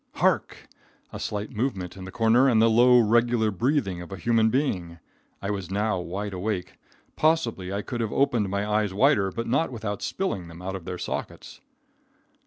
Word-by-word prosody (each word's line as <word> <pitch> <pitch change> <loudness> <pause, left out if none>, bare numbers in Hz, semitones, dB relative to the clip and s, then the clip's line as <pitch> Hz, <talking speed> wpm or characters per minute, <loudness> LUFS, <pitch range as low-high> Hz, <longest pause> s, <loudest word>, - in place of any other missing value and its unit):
Hark! - - 0 0.5
A - - -6
slight 105 0 -4
movement 100 -7 -3
in 95 -1 -8
the 95 - -8
corner, 120 +5 +4
and 115 -3 +3
the 115 0 +5
low, 125 +2 +6
regular 115 -1 +3
breathing 105 - 0
of 85 - -10
a 95 - -5
human 115 -2 +2
being! 95 - -1 0.5
I 100 - -1
was 100 -4 -4
now 100 0 0
wide 95 +4 -4
awake. 95 -1 -4 0.4
Possibly 155 - +1
I 100 +1 -2
could 120 -1 -4
have 110 - -2
opened 125 -8 +1
my 100 +1 -1
eyes 105 -2 0
wider, 95 -1 +3
but 115 +4 -4
not 135 +5 +1
without 110 -4 -4
spilling 100 - -3
them 85 0 -11
out 95 +1 -5
of 90 -3 -8
their 90 - -5
sockets. - - -6
105 Hz, 185 wpm, -26 LUFS, 95-120 Hz, 0.5 s, low